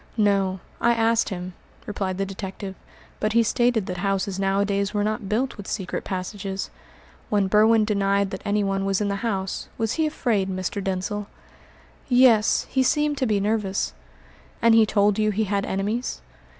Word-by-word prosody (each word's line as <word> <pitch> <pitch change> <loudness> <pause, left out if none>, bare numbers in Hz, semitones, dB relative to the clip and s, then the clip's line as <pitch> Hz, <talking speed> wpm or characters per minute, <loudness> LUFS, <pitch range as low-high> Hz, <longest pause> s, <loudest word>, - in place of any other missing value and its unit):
"No; 195 -3 +2 0.2
I 235 - +3
asked 225 0 +2
him," 180 -2 -5 0.3
replied 195 -3 -3
the 195 - 0
detective, 195 0 -6 0.5
"but 215 0 0
he 230 0 +5
stated 240 -1 +1
that 180 -1 -4
houses 195 0 -1
nowadays 200 +1 0
were 205 - +1
not 215 -1 -2
built 245 +5 -1
with 205 - -8
secret 190 -3 -3
passages. 190 +1 -4 0.6
When 205 -2 +2
Berwin 215 +2 +4
denied 200 -1 +1
that 190 - -5
anyone 200 -2 0
was 195 -1 +1
in 205 -1 0
the 200 - -1
house, 195 -4 -3
was 225 -1 0
he 315 - +3
afraid, 220 -10 0
Mr. 185 +1 -3
Denzil?" 195 +2 -2 0.8
"Yes, 245 -4 +5
he 265 - +2
seemed 295 +2 +1
to 260 - +1
be 210 -2 +2
nervous." 200 -1 -1 0.7
"And 230 -1 +5
he 225 -1 +6
told 205 0 +2
you 215 0 +3
he 210 +1 0
had 200 -1 -1
enemies?" 210 +6 -2
205 Hz, 165 wpm, -24 LUFS, 195-220 Hz, 0.8 s, he